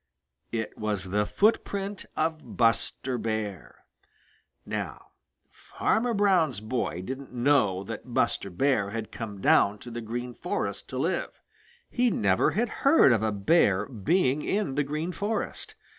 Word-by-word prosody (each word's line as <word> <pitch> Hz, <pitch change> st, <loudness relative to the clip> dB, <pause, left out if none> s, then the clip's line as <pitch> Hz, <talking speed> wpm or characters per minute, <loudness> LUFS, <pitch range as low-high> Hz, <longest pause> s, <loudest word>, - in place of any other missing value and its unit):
It 110 Hz, -2 st, -4 dB
was 105 Hz, -2 st, -1 dB
the 105 Hz, +1 st, +1 dB
footprint 200 Hz, -2 st, 0 dB
of 160 Hz, 0 st, -2 dB
Buster 120 Hz, +2 st, +1 dB
Bear. 110 Hz, -4 st, -4 dB, 0.8 s
Now -, -, -5 dB, 0.4 s
Farmer 235 Hz, +1 st, -1 dB
Brown's 185 Hz, -, +3 dB
boy 110 Hz, -5 st, -2 dB
didn't 135 Hz, +5 st, -6 dB
know 120 Hz, -7 st, +2 dB
that 115 Hz, +4 st, -7 dB
Buster 115 Hz, -4 st, 0 dB
Bear 100 Hz, +1 st, +1 dB
had 110 Hz, +1 st, -5 dB
come 105 Hz, -4 st, -6 dB
down 100 Hz, +2 st, +4 dB
to 120 Hz, +3 st, -10 dB
the 120 Hz, +1 st, -5 dB
Green 120 Hz, +2 st, -5 dB
Forest 100 Hz, -3 st, -3 dB
to 130 Hz, -, -5 dB
live. 165 Hz, +7 st, 0 dB, 0.6 s
He 245 Hz, 0 st, +2 dB
never 100 Hz, -, +2 dB
had 235 Hz, +5 st, 0 dB
heard 275 Hz, -, +6 dB
of 115 Hz, -3 st, +3 dB
a 110 Hz, 0 st, +1 dB
Bear 100 Hz, -, +3 dB
being 135 Hz, -, +1 dB
in 200 Hz, -9 st, 0 dB
the 145 Hz, +2 st, +1 dB
Green 155 Hz, +5 st, -3 dB
Forest. 205 Hz, +4 st, -3 dB
120 Hz, 140 wpm, -27 LUFS, 105-165 Hz, 0.8 s, heard